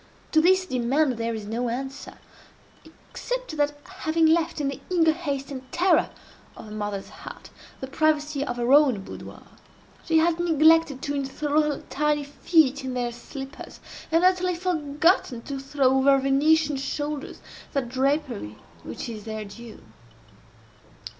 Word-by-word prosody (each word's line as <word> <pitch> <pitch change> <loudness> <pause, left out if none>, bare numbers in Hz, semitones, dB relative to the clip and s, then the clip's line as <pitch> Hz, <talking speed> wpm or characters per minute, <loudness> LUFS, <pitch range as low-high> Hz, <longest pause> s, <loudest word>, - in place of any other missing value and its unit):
To 315 - +5
this 375 +2 +4
demand 260 -1 +1
there 230 0 -1
is 215 -2 -6
no 235 +3 -2
answer—except 275 - -8
that, 295 0 +1
having 330 -3 0
left, 330 +1 +2
in 290 - 0
the 275 - -7
eager 335 -3 +4
haste 285 -4 -4
and 260 -1 -8
terror 355 +3 +3 0.5
of - - -10
a - - -11
mother's 205 -2 -4
heart, - - -11 0.3
the - - -3
privacy 300 0 0
of 245 -4 -4
her 240 +2 +2
own 270 -9 +5
boudoir, - - -10 0.6
she 325 - +2
has 330 +1 +2
neglected 320 -4 +4
to 285 - -2
enthral 290 +2 0
her 300 -2 -2
tiny 300 0 +1
feet 285 -1 +2
in 260 -1 -4
their 245 -1 -1
slippers, 270 +3 -9 0.3
and 330 +2 +3
utterly 365 -1 +3
forgotten 315 -6 +1
to 275 -1 -5
throw 270 -1 +1
over 275 +1 +5
her - - +5
Venetian 290 +2 +2
shoulders 290 +1 -4 0.3
that 275 -3 -1
drapery 260 - -1 0.3
which - - -6
is 215 -3 -7
their 220 -1 -5
due. 225 +3 -11
285 Hz, 145 wpm, -25 LUFS, 255-320 Hz, 0.6 s, To